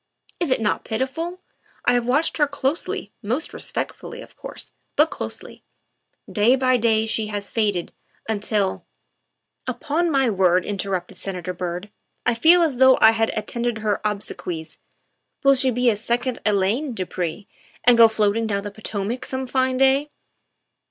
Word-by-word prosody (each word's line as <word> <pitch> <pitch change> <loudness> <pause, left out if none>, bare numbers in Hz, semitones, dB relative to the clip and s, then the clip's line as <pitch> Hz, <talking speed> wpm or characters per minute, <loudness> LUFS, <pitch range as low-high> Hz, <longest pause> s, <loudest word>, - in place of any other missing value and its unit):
Is 345 - 0
it 255 - +2
not 210 -2 0
pitiful? 325 +10 -3 0.4
I - - +4
have 245 -1 +1
watched 290 +6 +1
her 295 -2 +3
closely 285 +2 -2
most 245 +8 -2
respectfully, 470 +1 -5
of - - -17
course, - - -8 0.2
but 310 +2 +4
closely. - - -7 0.6
Day 225 +4 +3
by 255 -1 +3
day 220 -1 +2
she 220 -1 -1
has 205 -1 -5
faded, 205 -6 0 0.4
until 210 -2 -1 0.3
" - - -52
'* - - -35
Upon 335 +4 0
my 270 -4 +3
word," 185 -4 +3
interrupted 195 -3 -3
Senator 180 -2 -4
Byrd, 180 +3 -5 0.2
" - - -48
I 245 - +3
feel 330 +9 +5
as 295 -6 0
though 260 0 +7
I 220 - +8
had 225 0 +1
attended 235 +2 -2
her 215 -2 -1
obsequies. 180 -5 -4 0.6
Will 275 0 +7
she 265 0 +3
be 250 0 +1
a - - -1
second 240 +4 -1
Elaine, 210 +8 +1
du 185 - -2
Pre, 180 +3 -4 0.4
and 245 +1 +6
go 230 -1 +8
floating 220 0 +1
down 200 -2 -1
the 205 - -5
Potomac 215 +3 -4
some 260 0 -3
fine 260 0 +1
day 270 +2 +3
225 Hz, 165 wpm, -23 LUFS, 205-260 Hz, 0.6 s, I